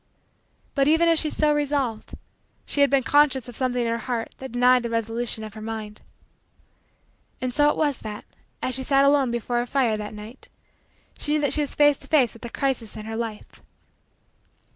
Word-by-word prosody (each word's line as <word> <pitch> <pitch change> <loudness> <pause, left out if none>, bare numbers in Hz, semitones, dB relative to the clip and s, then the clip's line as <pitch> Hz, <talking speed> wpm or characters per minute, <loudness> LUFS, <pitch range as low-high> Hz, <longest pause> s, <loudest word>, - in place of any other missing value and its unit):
But, 275 -1 +2
even 325 +2 +4
as 330 -1 +4
she 310 - 0
so 300 0 +2
resolved, 280 -6 -2 0.5
she 285 - -1
had 280 - +5
been 275 -1 +2
conscious 270 -1 +3
of 245 - -9
something 250 -1 0
in - - -1
her 230 0 -1
heart 235 -2 -4
that 265 -2 -7
denied 250 +1 +4
the 235 - -4
resolution 230 0 -2
of 215 -1 -8
her 215 - -9
mind. 215 -1 -6 1.4
And 255 -1 -3
so 295 +2 +4
it - - -1
was 290 -4 0
that, 210 -1 -7 0.4
as 255 - -1
she 265 - -1
sat 275 +1 +3
alone 280 -2 +4
before 240 0 -1
her 240 - -2
fire 240 -5 +1
that 210 0 -6
night, 215 +5 -11 0.7
she 295 - -1
knew 305 - +2
that 285 - +1
she 305 - +1
was 290 - -3
face 290 -1 +4
to - - -12
face 270 -8 +3
with 230 - -14
a 235 - -5
crisis 250 -5 -2
in 215 - -7
her 225 0 -5
life. 225 -2 -6
250 Hz, 205 wpm, -24 LUFS, 225-285 Hz, 1.4 s, had